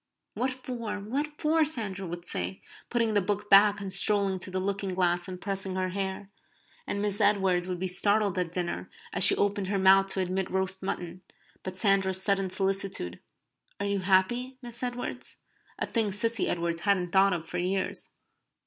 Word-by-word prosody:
"What 255 - 0 0.2
for? 230 -5 -4
What 285 +9 -4
for?" 315 +1 +3
Sandra 210 - -1
would 175 +1 -7
say, 90 - -3 0.3
putting 230 -2 +1
the 205 - +4
book 205 +2 -3
back, 205 +1 +7
and 195 -2 -4
strolling 195 0 +2
to 180 - -6
the 185 0 -1
looking 195 0 -2
glass 175 -1 +1
and 185 -1 -7
pressing 195 -1 -3
her 185 0 -1
hair. 195 +1 -4 0.6
And 200 - -2
Miss 205 +1 +1
Edwards 190 -3 +3
would 180 -1 -3
be 185 +2 -2
startled 200 +2 +1
at 175 -2 -2
dinner, 175 -1 -3 0.2
as - - +4
she - - +8
opened 200 -1 0
her 200 +1 0
mouth 195 0 +5
to 195 - -3
admit 185 0 -1
roast 190 0 -1
mutton, 180 -1 -4 0.4
by 185 - -5
Sandra's 190 -1 +2
sudden 195 -1 +1
solicitude: 190 - -2 0.6
"Are 200 - -2
you 200 0 0
happy, 200 +8 +1
Miss 235 -1 -6
Edwards?" 245 -1 -4 0.4
a - - 0
thing 225 -4 0
Cissy 225 +2 +1
Edwards 170 -1 -1
hadn't 185 -4 +1
thought 195 +1 +4
of 165 -2 -4
for 180 - -3
years. 185 +2 0
195 Hz, 180 wpm, -28 LUFS, 185-205 Hz, 0.6 s, she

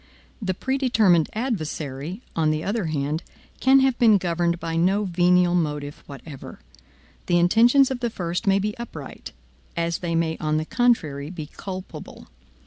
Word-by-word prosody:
The 190 -3 -1
predetermined 225 - +2
adversary, 170 - -4
on 160 -2 +2
the 155 0 -1
other 205 -1 -1
hand, 155 0 -2 0.4
can 265 +1 +5
have 265 -2 +1
been 220 -4 +6
governed 175 -1 -1
by 165 -1 -4
no 190 +5 +2
venial 180 -1 +3
motive 150 -4 -2
whatever. 140 0 -10 0.7
The 175 - +3
intentions 235 +10 +5
of 260 - -3
the 240 -1 -1
first 180 0 -4
may 195 0 +5
be 210 +2 -2
upright, 160 - -8 0.5
as 170 0 -1
they 170 -2 -2
may 165 -1 0
on 155 0 0
the 155 - -1
contrary 155 - +1
be 165 -4 -6
culpable. 190 -1 -8
175 Hz, 150 wpm, -24 LUFS, 160-215 Hz, 0.7 s, been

